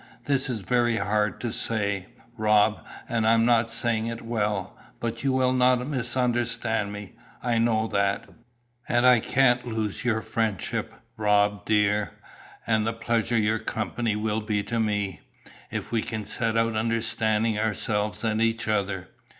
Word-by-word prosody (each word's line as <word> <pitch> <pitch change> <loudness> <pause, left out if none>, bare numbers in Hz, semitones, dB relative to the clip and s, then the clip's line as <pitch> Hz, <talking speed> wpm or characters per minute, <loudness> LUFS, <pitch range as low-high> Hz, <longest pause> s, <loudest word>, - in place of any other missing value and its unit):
"This 135 -2 +1
is 115 -4 -2
very 120 +3 +1
hard 105 +1 0
to 120 -2 -2
say, 100 -4 0 0.3
Rob, 105 -1 +3 0.2
and 115 -3 0
I 115 - +6
am 115 0 +3
not 115 -1 +3
saying 115 -1 -1
it 115 0 -5
well, 110 -3 -2 0.2
but 115 +1 -4
you 135 - +2
will 130 -1 +2
not 125 -1 +3
misunderstand 120 -5 -1
me, 105 -1 -8 0.3
I 120 -2 +1
know 115 -1 +2
that; 100 -2 0 0.6
and 120 +1 +3
I 125 -2 +7
can't 125 +1 +2
lose 110 -3 -3
your 110 -3 0
friendship, 110 -7 -2 0.3
Rob, 105 -1 +2
dear, 105 -3 +2 0.5
and 110 -1 +1
the 115 - 0
pleasure 115 +1 0
your 110 0 +2
company 110 0 -2
will 110 +1 -1
be 105 -1 -1
to 115 +2 -2
me, 105 -6 -1 0.5
if - - -5
we 115 -2 +1
can 110 -2 -4
set 115 0 -1
out 115 0 +1
understanding 110 -1 0
ourselves 105 0 -1
and 110 -1 0
each 115 0 +1
other. 100 -3 -1
110 Hz, 155 wpm, -26 LUFS, 105-115 Hz, 0.6 s, I